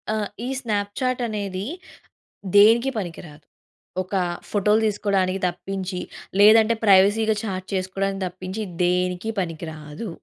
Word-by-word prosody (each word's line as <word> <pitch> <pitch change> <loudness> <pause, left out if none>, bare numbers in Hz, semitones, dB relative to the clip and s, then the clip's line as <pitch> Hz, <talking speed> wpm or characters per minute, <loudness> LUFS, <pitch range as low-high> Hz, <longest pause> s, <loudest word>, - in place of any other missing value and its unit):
ఆహ్! 210 -1 -2 0.2
ఈ - - -3
స్నాప్‌చాట్ 225 +4 -1
అనేది 200 -3 -4 0.9
దేనికి 230 +5 +6
పనికి 175 -5 -5
రాదు. 150 0 -16 0.6
ఒక 185 +2 -8 0.4
ఫోటో‌లు 210 +1 +3
తీసుకోవడానికి 195 -2 0
తప్పించి, 185 +1 -5 0.4
లేదంటే 220 +2 +7
ప్రైవసీ‌గా 205 +3 +5
చాట్ 185 -3 -4
చేసుకోవడానికి 195 +1 -2
తప్పించి 185 +4 -6 0.2
దేనికి 180 +3 0
పనికి 165 -2 -4
రాదు. 150 +7 -8
195 Hz, 110 wpm, -23 LUFS, 185-215 Hz, 0.9 s, లేదంటే